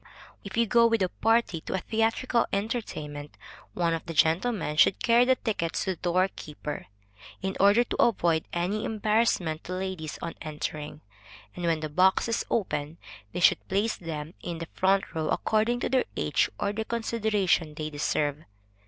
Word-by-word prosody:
If 200 +2 -7
you 235 - +4
go 235 +2 +5
with 230 -3 +2
a 185 - +1
party 225 -7 +1
to - - -4
a - - 0
theatrical 225 +4 +1
entertainment, 175 -9 -4 0.4
one 170 -2 +1
of 165 - -3
the 165 - -5
gentlemen 165 +1 +2
should 175 - +5
carry 235 +1 +5
the 260 +1 +4
tickets 200 -9 -2
to 190 - -1
the - - -3
door 180 +1 +2
keeper, 150 0 -7 0.6
in 190 0 -2
older 205 +5 +6
to - - -1
avoid 170 -8 +2
any 185 +5 -1
embarrassment 210 -7 +1
to 180 - -5
ladies 185 -4 -4
on 170 - -5
entering; 150 -1 -5 0.5
and 175 - -4
when 165 -2 +1
the 155 - -2
box 185 +8 +3
is 230 0 0
open, 160 -7 -1 0.3
they - - -4
should 175 - +4
place 205 +4 0
them 160 -2 -6
in 170 -1 -4
the 165 - -5
front 195 +1 +1
row, 160 -2 -2
according 225 +3 +1
to - - -1
their 260 0 +2
age, - - +1
or 200 - 0
the 220 +1 -2
consideration 215 -8 0
they 155 0 -4
deserve. 145 0 -1
185 Hz, 175 wpm, -27 LUFS, 160-220 Hz, 0.6 s, older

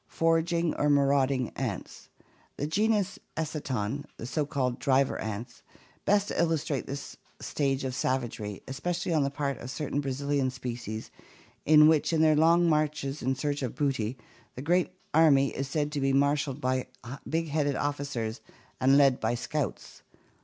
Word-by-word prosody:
Foraging 165 0 +1
or 150 - +2
marauding 140 -3 +3
ants. - - -5 0.5
The 145 - -2
genus 205 +3 +1 0.2
Eciton, 140 -5 -2
the - - -6
so 145 +3 -1
called 130 -4 -1
driver 135 0 +2
ants, 110 +3 -6 0.4
best 205 0 +2
illustrate 160 -5 0
this 140 +1 -6 0.2
stage 135 -2 -1
of 130 -1 -2
savagery, 120 -6 -2
especially 170 +6 -2
on 155 - +3
the 140 - +1
part 140 -1 -3
of 125 - -7
cer 150 +3 -4
tain 145 - +1
Brazilian 140 0 0
species 120 -4 -6 0.6
in 150 0 +8
which, 155 0 +3
in 160 - +3
their 155 -1 +5
long 170 +3 +5
marches 150 -2 0
in 130 +2 0
search 145 +1 -2
of 125 -4 -3
booty, 130 -5 -1 0.4
the 130 - -6
great 175 +4 +2 0.2
army 145 -4 +5
is 135 +1 -2
said 150 +1 -1
to 145 -2 -2
be 135 0 +2
marshaled 140 0 +1
by 130 -2 0 0.4
big 165 0 -1
headed 145 -2 0
officers 140 -6 -3 0.4
and 135 +2 +5
led 135 -3 +5
by 120 - 0
scouts! 150 +4 -4
140 Hz, 155 wpm, -28 LUFS, 130-155 Hz, 0.6 s, in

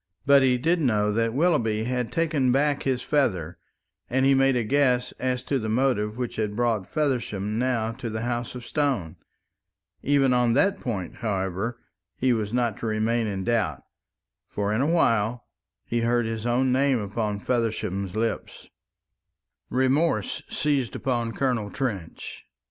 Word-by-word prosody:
But 140 0 +6
he 130 -1 +3
did 165 +7 +1
know 105 -6 +2
that 115 +2 +1
Willoughby 125 -10 +2
had 125 0 -2
taken 155 -6 +1
back 145 +2 +2
his 130 -2 -1
feather, 90 - 0 0.5
and 130 +1 +2
he 135 - +5
made 135 0 +3
a 120 - +1
guess 125 0 +2
as 125 -1 -1
to 140 - -1
the 110 -2 -3
motive 110 -3 +1
which 125 -2 -4
had 105 -2 -1
brought 115 -4 0
Feversham 115 -8 -1
now 120 -3 0
to 120 0 -6
the 110 +1 -4
House 120 0 -3
of 125 -1 -8
Stone. 130 - -1 0.8
Even 140 -2 +3
on 120 -1 +3
that 150 +10 +2
point, 100 -8 -4
however, 100 +2 -2 0.4
he 130 -1 +2
was 105 -3 -2
not 120 -3 0
to 115 - -4
remain 110 +1 0
in 95 -2 -3
doubt; 105 - 0 0.7
for 100 0 -1
in 110 - +1
a 140 - +2
while 120 -8 +2 0.4
he 120 0 -1
heard 120 0 +2
his 110 0 -3
own 125 +2 +2
name 135 0 +3
upon 105 0 -2
Feversham's 105 -5 -2
lips. 115 +1 -3 1.0
Remorse 130 - +1
seized 140 -5 0
upon 120 -3 -1
Colonel 120 -4 -1
Trench. 100 -10 -5
120 Hz, 155 wpm, -25 LUFS, 110-130 Hz, 1.0 s, But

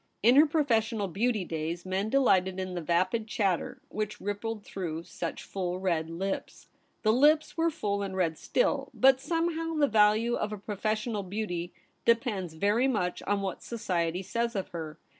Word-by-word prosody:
In 240 +4 +6
her 300 +3 +7
professional 230 -9 +1
beauty 210 +2 0
days, 165 +2 -4
men 190 +3 -1
delighted 190 -8 +3
in 185 -1 -3
the 175 - -3
vapid 185 +7 +1
chatter 195 -5 -1
which 215 0 -3
rippled 205 +2 -4
through 170 -5 -5
such 170 -1 -5
full 180 -2 -3
red 170 -4 0
lips. 190 +4 -4 0.3
The 215 0 +4
lips 300 +5 +4
were 330 0 +2
full 205 -11 -2
and 195 -1 -4
red 165 -3 +1
still, - - 0
but 265 0 +5
somehow 330 +1 -1
the 300 -2 +4
value 220 +1 +4
of 215 -2 -1
a 210 - -4
professional 215 +2 -2
beauty 180 -3 -4 0.3
depends 215 -8 +1
very 205 +9 +2
much 195 -9 -1
on 205 0 +1
what 190 -2 -3
society 180 -6 -2
says 235 +4 -2
of 195 - -2
her. 160 -3 -6
205 Hz, 165 wpm, -29 LUFS, 180-235 Hz, 0.3 s, her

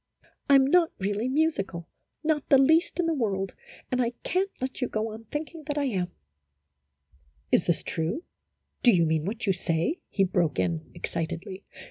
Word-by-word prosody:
I 280 - +8
'm 270 -1 +7
not 335 +3 +4
really 205 +5 -1
musical, 230 - 0 0.4
not 305 -2 0
the 275 - +8
least 320 +7 +4
in 350 - +3
the 330 - +2
world, 195 -8 -1 0.4
and 255 0 +2
I 240 0 0
can't 380 +2 +1
let 260 +2 -4
you 250 - +1
go 220 0 -2
on 220 +1 -9
thinking 310 +6 -5
that 295 -1 -2
I 290 - +2
am" 195 -10 0 0.8
" 70 -2 -38
Is - - +3
this - - +1
true; 165 - -2 0.6
do 245 - +7
you 170 -5 +4
mean 160 -1 +1
what 220 +4 -3
you 195 - +3
say? 175 - -1
" - - -53
he 195 - +2
broke 175 -6 +1
in, 85 -3 -1
excitedly. 175 +4 -4
215 Hz, 185 wpm, -27 LUFS, 170-285 Hz, 0.8 s, I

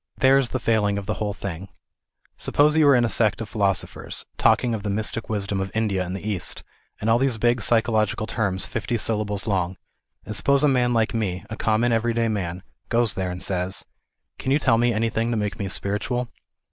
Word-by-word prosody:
There 135 +1 +5
is 130 -3 0
the - - -1
failing 105 -4 +1
of 100 - -4
the - - -1
whole 105 -1 -3
thing. 95 -1 -6 0.7
Suppose 150 +1 +2
you 155 -2 +5
are 140 - +7
in 120 -1 +4
a - - +2
sect 110 -2 +2
of 115 - -4
philosophers, 100 -3 -2
talking 120 -2 +3
of 110 - -2
the 105 - -3
mystic 110 +2 -2
wisdom 100 -2 -1
of 95 - -3
India 105 -4 +1
and 90 +1 -5
the 100 +2 -6
East, 100 -4 -3 0.4
and 105 - -3
all 115 +1 +4
these 135 -3 +1
big 120 +1 +2
psychological 110 -1 +2
terms 95 -4 0
fifty 115 +2 -2
sylla 110 -1 0
bles 100 -1 -3
long, 95 -4 -1 0.5
and 105 - -4
suppose 140 +5 +3
a - - +6
man 125 -3 +2
like 115 -1 +1
me, 95 -6 -2
a - - -3
common 110 +2 +1
every 115 0 +1
day 115 -1 +1
man, 90 -4 -3 0.3
goes 115 -2 +2
there 95 -1 -2
and 90 0 -5
says 95 0 -2 0.3
" - - -48
Can 130 - -2
you 140 - +5
tell 115 -6 +3
me 120 0 +3
any 115 0 0
thing 115 +2 0
to 115 - 0
make 105 +1 -2
me 100 - -2
spiritual 105 +6 -2
110 Hz, 220 wpm, -24 LUFS, 100-120 Hz, 0.7 s, are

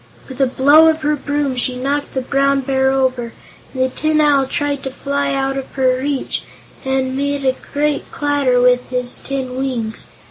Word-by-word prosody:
With 265 0 -6
a 270 - +4
blow 285 +5 +5
of 315 0 -1
her 300 0 +2
broom 290 -1 -2
she 250 0 -1
knocked 280 +3 -2
the 260 - 0
Brown 275 +1 +1
Bear 265 0 +1
over, 255 -3 0 0.4
and 260 -1 -1
the 260 - +1
Tin 310 +3 0
Owl 285 -3 +3
tried 285 0 -2
to 265 - -4
fly 280 +1 -2
out 270 0 -1
of 270 - -6
her 255 -1 +1
reach 280 -1 -2 0.4
and 265 0 -1
made 285 0 -1
a 260 0 +2 0.2
great 295 0 -1
clatter 285 -3 +1
with 250 0 +3
his 250 -1 0
tin 265 -2 -4
wings. 240 -5 -3
270 Hz, 185 wpm, -18 LUFS, 260-285 Hz, 0.4 s, blow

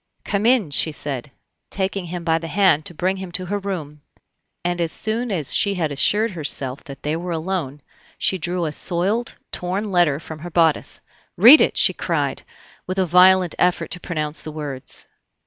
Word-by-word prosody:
"Come 205 +2 0
in," 240 - +3
she 155 +3 +3
said, 140 -3 -5 0.4
taking 190 -1 -2
him 175 0 -6
by 165 -1 +1
the 165 - -7
hand 185 -4 +3
to - - -4
bring 185 +4 -1
him 190 -2 -7
to 185 - -2
her 205 +3 -2
room, 160 -7 -6 0.6
and 175 0 -1
as 165 -1 -1
soon 225 +5 -1
as 160 -8 0
she 200 -1 +3
had 160 -5 -1
assured 210 +10 +3
herself 140 -6 -2
that 135 -1 -11
they 150 +2 -1
were 175 +2 -5
alone, 160 -4 -3 0.3
she 190 - 0
drew 175 +1 -2
a 155 - -2
soiled, 195 +10 0 0.2
torn 195 +4 -3
letter 170 -6 +2
from 160 -1 -9
her 175 +3 -7
bodice. 165 -2 +2 0.4
"Read 240 - +9
it!" - - +1
she - - +4
cried, - - -2 0.5
with 185 +1 -4
a 190 - +2
violent 180 0 +5
effort 180 0 +1
to 180 - -3
pronounce 155 -4 -3
the 155 - -7
words. 145 -4 -4
175 Hz, 185 wpm, -21 LUFS, 155-190 Hz, 0.6 s, Read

